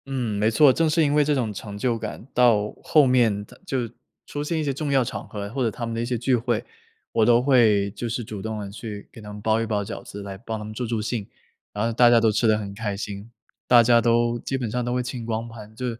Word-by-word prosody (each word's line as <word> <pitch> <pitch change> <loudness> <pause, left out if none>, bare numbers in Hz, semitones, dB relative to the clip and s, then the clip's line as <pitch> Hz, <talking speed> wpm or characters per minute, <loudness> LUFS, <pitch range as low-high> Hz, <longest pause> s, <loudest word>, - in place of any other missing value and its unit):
嗯， 125 -6 -2
没 105 +1 +3
错， 130 +4 +6
正 165 +4 +2
是 160 +1 +3
因 145 -1 +2
为 150 0 +4
这 150 0 +1
种 115 -5 -1
成 100 +1 -7
就 120 +2 0
感。 115 +2 -7
到 110 -4 +3
后 150 -3 +5
面 115 -6 +2
到 - - -17
就 130 -7 -1 0.4
出 145 - -4
现 160 +2 -2
一 - - -1
些 140 -2 -1
重 145 +1 -3
要 135 -2 +4
场 - - -6
合， 100 -1 -5
或 135 -1 -1
者 115 - +2
他 120 +2 -5
们 115 - -4
的 115 - -2
一 - - -1
些 120 0 -1
聚 125 +3 +2
会， 120 -1 -1 0.5
我 110 - +3
都 120 0 +5
会 115 -7 +3
就 115 +3 -5
是 120 +2 -3
主 105 -2 -7
动 110 0 -4
地 100 -1 -6
去 105 -1 -8
给 115 - -12
他 105 0 -9
们 105 - -8
包 110 +1 +2
一 - - -1
包 105 -2 -1
饺 110 +3 -7
子， 100 0 -8
来 100 -1 -7
帮 110 -1 -5
他 105 - -7
们 110 - -7
助 120 +2 -4
助 115 -1 -1
兴。 110 -2 -3 0.4
然 105 +2 -2
后 115 - -1
大 120 +1 +6
家 120 -1 +6
都 110 -1 +3
吃 110 +2 +1
得 110 -1 +4
很 100 -2 -6
开 100 -1 -4
心 100 +2 -7 0.3
大 120 -1 +7
家 115 0 +5
都 120 +1 +2
基 135 - -3
本 120 -4 -3
上 125 +3 -2
都 120 +1 -2
会 125 - 0
清 125 -2 -5
光 115 0 -3
盘。 110 -2 -11
就 125 +3 -5
115 Hz, 300 characters per minute, -24 LUFS, 105-125 Hz, 0.5 s, 大